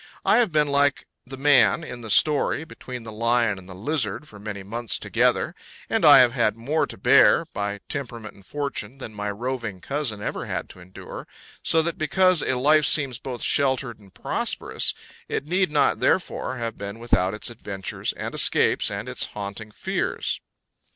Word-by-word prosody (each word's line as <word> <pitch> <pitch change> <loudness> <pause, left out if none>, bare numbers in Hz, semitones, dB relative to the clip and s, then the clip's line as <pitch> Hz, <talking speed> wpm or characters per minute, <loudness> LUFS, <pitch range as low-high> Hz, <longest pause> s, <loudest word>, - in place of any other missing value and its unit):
I - - +5
have 235 -6 +3
been 150 -1 +2
like 140 0 +2 0.2
the 135 +1 -8
man 140 +1 +4
in 125 -5 -8
the 110 - -8
story, 150 +6 +3
between 125 -6 -9
the 110 - -8
lion 115 -2 +1
and 95 0 -15
the 95 - -9
lizard 120 +3 -2
for 105 - -13
many 100 -1 -6
months 115 +3 -1
together; - - +1 0.4
and - - +1
I - - +9
have 125 -1 +4
had 115 -3 0
more 140 +8 0
to - - -8
bear, - - +5
by 100 0 -3
temperament 115 -6 -6
and 100 - -18
fortune, 135 -2 -4
than 115 -5 -8
my 105 0 -4
roving 115 -2 -4
cousin 135 -3 -3
ever - - -4
had - - -4
to - - -13
endure; 90 +1 -10 0.3
so 160 -1 +4
that 170 0 -3
because 185 +2 +3
a 130 - 0
life 150 +4 +4
seems 135 -5 +2
both 130 -3 -6
sheltered 130 -4 +1
and 100 -2 -18
prosperous, - - -1 0.3
it - - -2
need 185 +3 +1
not 150 -1 +2
therefore 155 -7 0
have 115 -2 -5
been 100 +2 -6
without 95 -4 +1
its 110 - -3
adventures 100 -4 -4
and - - -6
escapes - - +3
and - - -5
its - - -1
haunting 105 +1 -6
fears. 105 - -2
120 Hz, 180 wpm, -24 LUFS, 105-145 Hz, 0.4 s, I